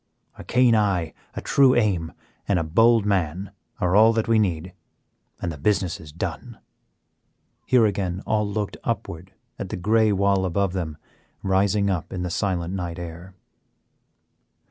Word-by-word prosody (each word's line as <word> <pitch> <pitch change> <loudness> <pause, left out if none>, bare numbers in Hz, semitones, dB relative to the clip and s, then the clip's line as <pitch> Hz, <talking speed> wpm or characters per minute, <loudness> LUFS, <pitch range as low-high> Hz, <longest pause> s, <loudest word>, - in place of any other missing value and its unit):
A - - -10
keen 125 -1 +3
eye, 90 -7 +1 0.2
a - - -4
true 135 -2 +4
aim, 95 -8 +1 0.4
and 100 - +2
a 85 - 0
bold 115 +7 +4
man 95 -1 -1 0.3
are 90 +1 +1
all 110 +2 +6
that 115 -1 -1
we 115 -1 +4
need, 90 -3 -1 0.7
and 85 - -3
the 75 - -9
business 95 +1 0
is 75 -2 -11
done." 85 - -6 1.1
Here 125 -3 +5
again 95 -2 -2
all 105 -1 0
looked 105 -1 -3
upward 95 -5 -4 0.3
at - - -5
the - - -4
gray 110 +4 +3
wall 100 -1 +2
above 95 +1 0
them, 80 -5 -4 0.5
rising 100 +1 +2
up 90 -4 -3
in 90 -1 -4
the 90 - -3
silent 90 -2 -1
night 85 -3 -4
air. 85 +2 -9
95 Hz, 155 wpm, -24 LUFS, 85-105 Hz, 1.1 s, all